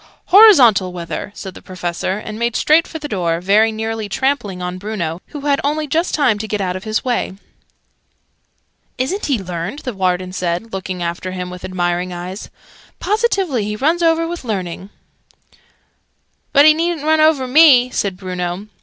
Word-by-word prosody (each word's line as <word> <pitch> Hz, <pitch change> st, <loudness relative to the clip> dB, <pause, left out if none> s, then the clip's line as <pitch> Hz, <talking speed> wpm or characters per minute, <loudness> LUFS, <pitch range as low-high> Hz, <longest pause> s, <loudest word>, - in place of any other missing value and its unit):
"Horizontal 275 Hz, -, +7 dB
weather," 175 Hz, +3 st, -6 dB
said 190 Hz, -2 st, -8 dB
the -, -, -12 dB
Professor, 185 Hz, +1 st, -4 dB
and 215 Hz, +1 st, -7 dB
made 235 Hz, 0 st, -1 dB
straight 315 Hz, +2 st, +3 dB
for 320 Hz, -, -7 dB
the 300 Hz, -1 st, -6 dB
door, 170 Hz, -, -1 dB
very 210 Hz, +5 st, +3 dB
nearly 220 Hz, -1 st, -4 dB
trampling 240 Hz, -6 st, -1 dB
on 180 Hz, 0 st, -5 dB
Bruno, 185 Hz, -5 st, -4 dB
who 295 Hz, -, -8 dB
had 280 Hz, -1 st, +1 dB
only 300 Hz, +2 st, 0 dB
just 330 Hz, +4 st, 0 dB
time 255 Hz, -9 st, +2 dB
to 220 Hz, -, -4 dB
get 210 Hz, -1 st, -2 dB
out 185 Hz, -2 st, -2 dB
of 185 Hz, -, -7 dB
his 215 Hz, +4 st, -2 dB
way. 240 Hz, -6 st, -1 dB, 1.6 s
"Isn't 325 Hz, +11 st, -2 dB
he 275 Hz, -4 st, +1 dB
learned?" 180 Hz, +4 st, -5 dB
the 250 Hz, -, -3 dB
Warden 185 Hz, -1 st, -1 dB
said, 180 Hz, +4 st, -3 dB
looking 185 Hz, -2 st, -4 dB
after 175 Hz, +2 st, -4 dB
him 180 Hz, -1 st, -5 dB
with 180 Hz, 0 st, -10 dB
admiring 180 Hz, 0 st, -2 dB
eyes. 180 Hz, +3 st, -7 dB, 0.5 s
"Positively 390 Hz, -, 0 dB
he 210 Hz, +1 st, -3 dB
runs 315 Hz, +9 st, +1 dB
over 330 Hz, 0 st, +2 dB
with 345 Hz, -2 st, -6 dB
learning!" 190 Hz, -4 st, -4 dB, 1.6 s
"But 285 Hz, 0 st, +6 dB
he 310 Hz, -, +8 dB
needn't 330 Hz, -1 st, -2 dB
run 315 Hz, 0 st, +3 dB
over 310 Hz, -4 st, +3 dB
me!" 255 Hz, -3 st, +6 dB
said 195 Hz, -6 st, -2 dB
Bruno. 180 Hz, 0 st, -4 dB
215 Hz, 170 wpm, -18 LUFS, 185-285 Hz, 1.6 s, he